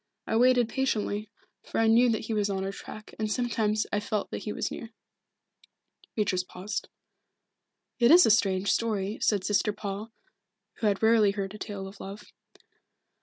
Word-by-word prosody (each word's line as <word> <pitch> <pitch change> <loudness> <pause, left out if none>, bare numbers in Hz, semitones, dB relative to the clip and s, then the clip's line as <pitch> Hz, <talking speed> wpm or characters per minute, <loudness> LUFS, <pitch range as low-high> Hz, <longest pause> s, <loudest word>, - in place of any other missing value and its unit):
I - - -1
waited 245 0 +4
patiently, 215 -5 -1 0.3
for - - -6
I 225 - +4
knew 235 +2 +5
that 220 -2 0
he 225 - -3
was 210 -1 +1
on 190 -1 -2
our 195 - -2
track, 215 +2 -10
and 215 -1 -1
sometimes 215 -3 0
I 205 - +2
felt 210 0 -3
that - - -3
he 210 - -2
was - - -3
near." 230 - -7 1.3
Beatrice 190 -4 +1
paused. 185 +3 -5 1.1
"It 235 0 +5
is 350 +4 +8
a - - +5
strange 195 -2 +2
story," 210 -2 -1
said 205 -3 +2
Sister 205 +2 +1
Paul, 205 +2 -6 0.7
who 220 - 0
had 200 +1 0
rarely 220 -2 +5
heard 195 -1 -4
a 210 - -9
tale 195 -2 -5
of 195 +1 -12
love. 200 +2 -8
210 Hz, 170 wpm, -28 LUFS, 200-225 Hz, 1.3 s, is